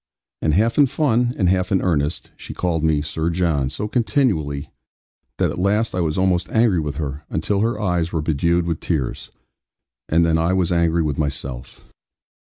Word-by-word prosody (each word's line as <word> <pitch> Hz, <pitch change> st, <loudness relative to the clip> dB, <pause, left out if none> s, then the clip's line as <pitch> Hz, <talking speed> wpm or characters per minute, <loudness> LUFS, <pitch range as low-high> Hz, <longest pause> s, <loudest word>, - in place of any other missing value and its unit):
And 75 Hz, -1 st, +1 dB
half 115 Hz, -, +2 dB
in 145 Hz, -, +6 dB
fun, 125 Hz, -3 st, +1 dB
and 95 Hz, -, +2 dB
half 90 Hz, +1 st, +1 dB
in 95 Hz, -, +3 dB
earnest, 75 Hz, -3 st, -1 dB
she -, -, -9 dB
called 85 Hz, -3 st, -1 dB
me 75 Hz, -2 st, +2 dB
'Sir 80 Hz, +1 st, -2 dB
John' 80 Hz, -6 st, 0 dB
so 105 Hz, +9 st, -4 dB
continually, 105 Hz, -, 0 dB, 0.7 s
that -, -, +1 dB
at -, -, -6 dB
last 105 Hz, +4 st, +1 dB
I 90 Hz, -, -1 dB
was 80 Hz, -3 st, -1 dB
almost 95 Hz, -1 st, +1 dB
angry 110 Hz, -6 st, +3 dB
with 75 Hz, -2 st, -3 dB
her; 70 Hz, -1 st, -4 dB
until 100 Hz, +5 st, -1 dB
her 110 Hz, 0 st, 0 dB
eyes 90 Hz, -5 st, 0 dB
were 80 Hz, -2 st, -1 dB
bedewed 85 Hz, +3 st, +1 dB
with 85 Hz, -2 st, -2 dB
tears; 75 Hz, -8 st, -3 dB, 0.8 s
and 85 Hz, +1 st, +3 dB
then 80 Hz, -1 st, +2 dB
I 85 Hz, +3 st, +1 dB
was 90 Hz, -2 st, +1 dB
angry 85 Hz, -1 st, +2 dB
with 75 Hz, -2 st, -2 dB
myself. 70 Hz, -4 st, -4 dB
85 Hz, 185 wpm, -21 LUFS, 80-100 Hz, 0.8 s, in